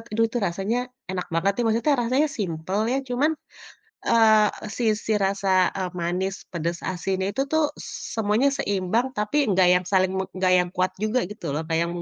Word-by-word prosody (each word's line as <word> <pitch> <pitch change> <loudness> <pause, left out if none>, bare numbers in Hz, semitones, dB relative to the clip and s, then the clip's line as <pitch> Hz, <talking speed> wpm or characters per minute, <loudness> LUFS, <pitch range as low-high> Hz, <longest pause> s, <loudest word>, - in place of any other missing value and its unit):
aduh 225 - +4
tuh 240 - -1
rasanya 195 +7 -2 0.3
enak 185 -1 -3
banget 190 +4 +2
tuh, - - +2
maksudnya 235 +7 +2
rasanya 260 +6 +2
simpel 180 +1 -2
ya 255 - +1
cuman, 265 +5 +1 0.8
eee, 220 -2 +5 0.3
sisi 220 -2 0
rasa, 195 0 -2 0.3
eee, 185 -1 -1
manis, 180 +3 -1 0.2
pedas, 170 0 -3
asin, 190 +1 -2
itu 270 - -1
tuh 315 0 +3 0.2
s - - -8 0.3
semuanya 215 +5 +2
seimbang 200 +5 0
tapi 210 +7 0
nggak 185 -1 +4
yang 180 0 +1
saling 185 -1 +3
me 190 - 0
enggak 185 0 +2
yang 180 - 0
kuat 185 +1 +1
juga 215 +4 +1
gitu 210 - -9
loh 155 - -1
kayak 165 0 +1
yang - - -4
200 Hz, 180 wpm, -24 LUFS, 185-230 Hz, 0.8 s, eee